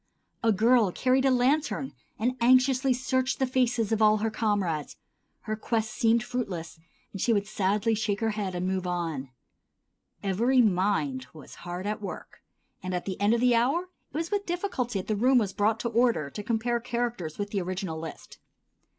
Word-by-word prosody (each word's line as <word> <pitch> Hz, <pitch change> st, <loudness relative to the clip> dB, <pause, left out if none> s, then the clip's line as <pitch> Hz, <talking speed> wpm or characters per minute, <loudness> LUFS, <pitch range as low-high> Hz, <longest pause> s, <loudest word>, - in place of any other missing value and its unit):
A 230 Hz, -, +3 dB
girl 220 Hz, 0 st, +4 dB
carried 260 Hz, +6 st, +2 dB
a -, -, +5 dB
lantern 265 Hz, +2 st, +1 dB, 0.2 s
and 245 Hz, +4 st, 0 dB
anxiously 255 Hz, +2 st, +4 dB
searched 260 Hz, +1 st, 0 dB
the 265 Hz, -, +1 dB
faces 245 Hz, -4 st, +1 dB
of 220 Hz, -1 st, +1 dB
all 215 Hz, 0 st, +5 dB
her 220 Hz, +1 st, -1 dB
comrades; 195 Hz, -9 st, -1 dB, 0.4 s
her 215 Hz, -1 st, -3 dB
quest 220 Hz, 0 st, -1 dB
seemed 230 Hz, 0 st, +2 dB
fruitless, 190 Hz, -11 st, -4 dB, 0.3 s
and 195 Hz, -, -6 dB
she 240 Hz, -, +2 dB
would 205 Hz, -2 st, +2 dB
sadly 210 Hz, +1 st, 0 dB
shake 210 Hz, -2 st, -1 dB
her 225 Hz, -1 st, 0 dB
head 200 Hz, -3 st, -3 dB
and 175 Hz, +1 st, -2 dB
move 185 Hz, -1 st, -1 dB
on. 165 Hz, -7 st, -3 dB, 0.9 s
Every 230 Hz, +7 st, +2 dB
mind 180 Hz, -, +1 dB
was 155 Hz, -3 st, -12 dB, 0.2 s
hard 180 Hz, +2 st, -4 dB
at 210 Hz, 0 st, -2 dB
work, 200 Hz, -, -8 dB, 0.4 s
and 185 Hz, -1 st, -3 dB
at 180 Hz, -, -3 dB
the 190 Hz, 0 st, -5 dB
end 210 Hz, +3 st, +4 dB
of 235 Hz, -, -1 dB
the 250 Hz, -1 st, +4 dB
hour 260 Hz, +9 st, +2 dB, 0.3 s
it 285 Hz, -, -5 dB
was 330 Hz, +3 st, -3 dB
with 405 Hz, -1 st, -1 dB
difficulty 340 Hz, -, -2 dB
that 185 Hz, -, -5 dB
the 215 Hz, -, 0 dB
room 250 Hz, +5 st, +4 dB
was 210 Hz, -5 st, +1 dB
brought 215 Hz, +2 st, +1 dB
to 235 Hz, -, -1 dB
order 230 Hz, -, +1 dB
to 210 Hz, -, -5 dB
compare 235 Hz, +2 st, 0 dB
characters 235 Hz, -9 st, -3 dB
with 205 Hz, 0 st, -4 dB
the 200 Hz, -, -1 dB
original 180 Hz, -2 st, -4 dB
list. 160 Hz, -1 st, -9 dB
220 Hz, 185 wpm, -27 LUFS, 190-245 Hz, 0.9 s, a